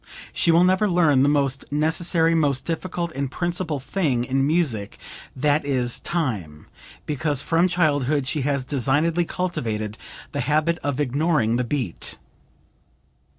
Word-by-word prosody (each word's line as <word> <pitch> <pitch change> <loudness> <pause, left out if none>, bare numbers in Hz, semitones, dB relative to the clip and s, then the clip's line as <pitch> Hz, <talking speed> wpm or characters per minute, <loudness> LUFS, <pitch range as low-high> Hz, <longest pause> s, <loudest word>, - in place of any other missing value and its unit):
She - - +1
will 165 +1 +6
never 185 +3 +3
learn 160 -7 +3
the 140 - +4
most 140 -2 0
necessary, 165 +2 +1
most 145 -5 +1
difficult 170 0 -3
and 140 -2 -3
principal 175 -1 -2
thing 135 -4 -1
in 135 +2 0
music, 145 -11 0 0.4
that 145 +3 +1
is 130 -4 -1
time, 105 - -3 0.4
because 150 -1 -1
from 170 +2 +2
childhood 150 -5 +1
she 145 +2 -1
has 140 -1 -1
designedly 145 +6 +1
cultivated 110 - -3 0.3
the - - -3
habit 155 +5 +1
of 145 -1 -3
ignoring 140 -4 +1
the 125 - 0
beat." 120 - -3
145 Hz, 135 wpm, -23 LUFS, 130-165 Hz, 0.4 s, will